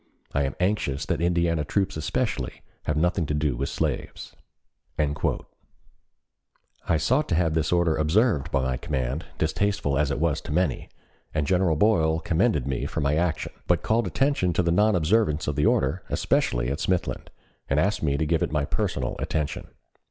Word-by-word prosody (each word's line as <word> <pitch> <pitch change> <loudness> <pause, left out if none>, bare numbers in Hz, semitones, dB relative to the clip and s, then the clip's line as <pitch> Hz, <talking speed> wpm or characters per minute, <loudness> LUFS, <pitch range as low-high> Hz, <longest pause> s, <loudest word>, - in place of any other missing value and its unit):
I 70 0 +1
am 70 - -3
anxious 90 -8 0
that - - -1
Indiana 85 -2 +1
troops 95 +6 -1
especially 80 - -2 0.2
have 75 - 0
nothing 85 0 +1
to 75 - -1
do 75 -3 0
with 70 +3 -2
slaves." - - -3 0.6
I 75 +2 -5
sought 130 - +1
to 85 - +2
have 80 -2 +2
this 80 -1 0
order 85 -2 +3
observed 80 - +2
by 70 -3 +1
my 65 -1 -1
command, 65 +2 -3
distasteful 80 -3 0
as 75 -2 +2
it 70 - -2
was 80 -1 +1
to 85 - -8
many, 80 -4 0 0.5
and 75 -2 +1
General 90 -1 +2
Boyle 80 -4 +3
commended 80 - +1
me 65 -3 -2
for - - -4
my 70 -1 +1
action, 80 -1 -1 0.2
but 85 -3 +2
called 110 -1 +1
attention 135 - +1
to 90 - +1
the 85 - +1
non 105 +4 +3
observance 85 -2 +2
of 75 - -1
the 75 +1 +2
order, 70 +7 +1
especially - - +1
at 70 - -3
Smithland, 90 +1 -1 0.4
and 70 - +2
asked 100 +7 +1
me 70 -2 +1
to 80 - 0
give 80 +1 +1
it - - 0
my 75 -2 0
personal - - -2
attention. 75 -3 -2
80 Hz, 175 wpm, -25 LUFS, 75-90 Hz, 0.6 s, order